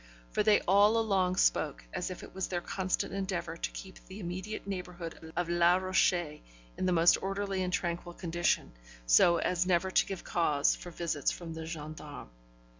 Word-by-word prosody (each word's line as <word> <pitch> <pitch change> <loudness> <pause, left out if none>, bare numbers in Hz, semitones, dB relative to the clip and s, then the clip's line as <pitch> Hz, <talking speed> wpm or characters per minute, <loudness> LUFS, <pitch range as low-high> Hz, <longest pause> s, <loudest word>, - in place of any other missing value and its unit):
For - - +1
they 210 0 +4
all 205 +4 +4
along 195 -5 +1
spoke 155 -6 +1
as 180 0 -2
if 185 - -7
it - - -11
was 190 0 -2
their 175 - -2
constant 185 +2 -2
endeavour 185 -4 -3
to - - -3
keep 190 -1 -10
the 190 +2 -9
immediate 185 +3 -5
neighbourhood 180 -4 -6
of 175 0 0
Les 175 +1 +4
Rochers 180 -4 +1 0.4
in 185 - -1
the - - +2
most 170 0 +5
orderly 195 0 -2
and 180 -1 -1
tranquil 175 -1 -2
condition, 170 0 0 0.3
so - - +6
as 180 +1 0
never 185 +1 +2
to - - +4
give 195 -3 -5
cause 150 -5 +2
for 175 - -9
visits 165 -4 -1
from 170 -2 -6
the 160 0 -6
gendarmes. 155 - -8
180 Hz, 180 wpm, -31 LUFS, 170-190 Hz, 0.4 s, so